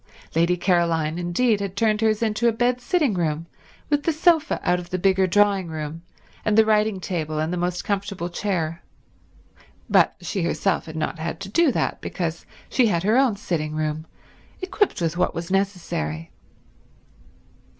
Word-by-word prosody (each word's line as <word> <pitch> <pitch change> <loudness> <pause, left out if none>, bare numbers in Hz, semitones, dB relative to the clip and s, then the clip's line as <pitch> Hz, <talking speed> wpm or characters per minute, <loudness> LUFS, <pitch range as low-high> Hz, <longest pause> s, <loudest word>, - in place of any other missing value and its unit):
Lady 170 +2 +3
Caroline, 170 -3 +1
indeed, 200 +6 +1
had 200 -1 -4
turned 215 +1 +1
hers 220 0 +2
into 220 +1 +1
a - - +5
bed 245 +2 0
sitting 310 - +1
room, 165 -3 -1 0.5
with 290 0 +3
the 330 - +1
sofa 320 0 +2
out 180 - +2
of 175 -1 -9
the 185 - -1
bigger 190 0 +3
drawing 200 -1 +3
room 155 0 -5 0.4
and 215 0 +1
the 220 - +7
writing 215 -2 +2
table 160 -4 -3
and 155 +3 -1
the - - -1
most 180 0 -2
comfortable 200 -3 -2
chair, 170 -3 -2 1.1
but - - +4
she 195 - -3
herself 170 +2 0
had 160 - -8
not 155 +1 -3
had 160 +1 -4
to 195 - -7
do 320 +7 +3
that - - -1
because 170 -3 -4 0.2
she 250 -3 +3
had 170 -5 0
her 215 +4 +3
own 260 -5 +4
sitting 155 -6 -3
room, 155 0 -2 0.5
equipped 375 - 0
with 165 0 -1
what 180 - +1
was 170 +1 -5
necessary. 175 - -2
185 Hz, 170 wpm, -23 LUFS, 165-215 Hz, 1.1 s, the